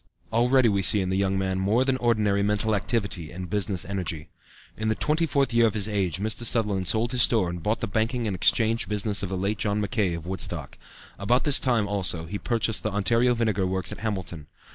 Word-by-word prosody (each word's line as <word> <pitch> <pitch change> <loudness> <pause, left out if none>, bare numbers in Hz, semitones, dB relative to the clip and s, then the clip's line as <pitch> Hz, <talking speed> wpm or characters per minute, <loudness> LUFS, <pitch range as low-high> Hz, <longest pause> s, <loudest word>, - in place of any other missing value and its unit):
Already 125 +2 +4
we 100 -3 +1
see 105 +2 +6
in 95 -1 -1
the - - 0
young 95 0 +1
man 95 -1 -1
more 110 +7 +2
than 135 -1 +1
ordinary 105 -5 +1
mental 105 +2 0
activity 100 -6 -2
and 90 -1 -7
business 100 -3 -1
energy. 90 -6 -5 0.5
In 110 - -3
the 110 - +1
twenty 155 +6 0
fourth 140 -4 0
year 115 0 +5
of 110 - -3
his 105 -1 +1
age 95 -5 -1
Mr. 110 +3 -2
Sutherland 105 -6 0
sold 115 +3 +1
his 125 - 0
store 105 -8 +2
and 90 -1 -6
bought 105 +5 -1
the 115 - -1
banking 115 +4 -1
and 100 -3 -2
exchange 110 +2 +2
business 105 0 -1
of 100 - -3
the 95 - -3
late 100 +3 -2
John 105 0 0
Mackay, 105 -4 0
of 85 -1 -8
Woodstock. 95 +1 -5 0.4
About 120 +6 +1
this 145 -2 +4
time, 120 -5 +1
also, 95 -5 -1
he 100 +5 -5
purchased 115 -3 0
the 110 - -2
Ontario 115 +5 +2
Vinegar 110 -5 0
Works 95 0 -2
at - - -7
Hamilton. 95 -8 -4
105 Hz, 220 wpm, -25 LUFS, 95-115 Hz, 0.5 s, see